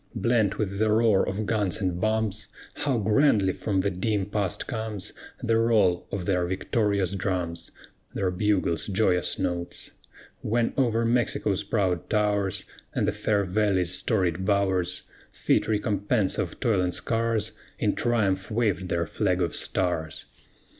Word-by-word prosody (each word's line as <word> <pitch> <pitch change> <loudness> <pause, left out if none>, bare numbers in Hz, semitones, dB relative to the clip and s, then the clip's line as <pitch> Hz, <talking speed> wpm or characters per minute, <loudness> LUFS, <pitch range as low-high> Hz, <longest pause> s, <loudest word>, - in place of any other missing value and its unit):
Blent 115 -4 +1
with 100 -2 -2
the 110 0 +2
roar 110 -3 +3
of 105 +3 -3
guns 105 -2 0
and 90 -3 -2
bombs, 110 -1 -1 0.3
How 140 -4 -1
grandly 105 -3 +3
from 100 -3 -1
the 100 - 0
dim 100 +2 -1
past 100 -2 -2
comes 110 -4 -5 0.3
The 115 -1 +2
roll 105 -6 +2
of 95 -3 -3
their 90 -3 +1
victorious 100 0 0
drums, 90 -3 -2 0.5
Their 95 -2 0
bugle's 95 -3 0
joyous 95 -2 +1
notes, 90 -3 -4 0.5
When 115 +2 0
over 115 -4 +2
Mexico's 115 -4 +1
proud 95 -4 -1
towers, 105 -3 0 0.3
And - - +1
the - - +2
fair 105 -2 0
valley's 95 -2 +1
storied 95 -5 0
bowers, 95 -3 0 0.3
Fit - - +1
recompense 105 -1 0
of - - -3
toil 105 -5 +2
and 90 -1 0
scars, 115 -1 0 0.3
In - - +1
triumph 100 -6 0
waved 105 -5 0
their 85 0 0
flag 90 +3 0
of 85 -3 0
stars. 80 -4 -1
100 Hz, 140 wpm, -26 LUFS, 90-110 Hz, 0.5 s, roar